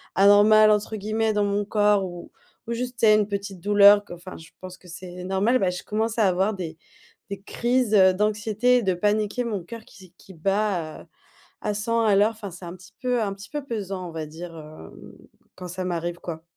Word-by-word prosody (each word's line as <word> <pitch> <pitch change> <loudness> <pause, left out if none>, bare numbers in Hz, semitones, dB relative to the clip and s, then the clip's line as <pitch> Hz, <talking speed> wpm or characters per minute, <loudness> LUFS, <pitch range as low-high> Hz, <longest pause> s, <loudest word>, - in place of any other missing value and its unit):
«anormal» 205 +2 +6
entre 210 +1 0
guillemets 215 +2 -1
dans 210 0 +1
mon 205 0 -1
corps 205 -2 +2
ou 175 -1 -9 0.4
ou 235 - -2
juste 245 +1 -5
tu 225 - +4
sais 215 - +7
une 210 -1 +1
petite 200 -2 -5
douleur 205 +1 +6
que - - -10
enfin, 180 +2 -10
je 160 - -14
pense 185 -1 -9
que 180 - -19
c'est 180 0 -9
normal, 195 +7 +1
bah, 185 -6 0
je 180 - -6
commence 225 +2 -2
à 205 - +4
avoir 190 +4 +1
des 165 -4 -6 0.5
des 195 -1 -5
crises, 240 0 0
heu, 190 -1 +6
d'anxiété 215 +4 +1
et 240 - 0
de 190 -2 +1
paniquer. 210 +5 0
Mon 205 -6 -3
coeur 230 +4 -9
qui 190 -3 -16
se 175 - -21
qui 190 - -15
bat 195 -2 -1
à - - -15 0.5
à 210 - -2
100 230 +3 0
à 210 -3 +3
l'heure. 210 +3 +4
Enfin, 215 -3 -8
c'est 180 +1 -11
un 170 - -7
petit 185 -1 -17
peu, 250 -2 0
un 205 -2 -1
petit 200 +1 -12
peu 295 -1 -4
pesant, 195 -7 -5
on - - -9
va 160 -1 -5
dire, 165 +2 -9
heu, 155 - -12 0.6
quand 180 -1 -8
ça 185 +2 -5
m'arrive 175 -1 -3
quoi. 160 -2 -7
200 Hz, 225 wpm, -24 LUFS, 180-215 Hz, 0.6 s, sais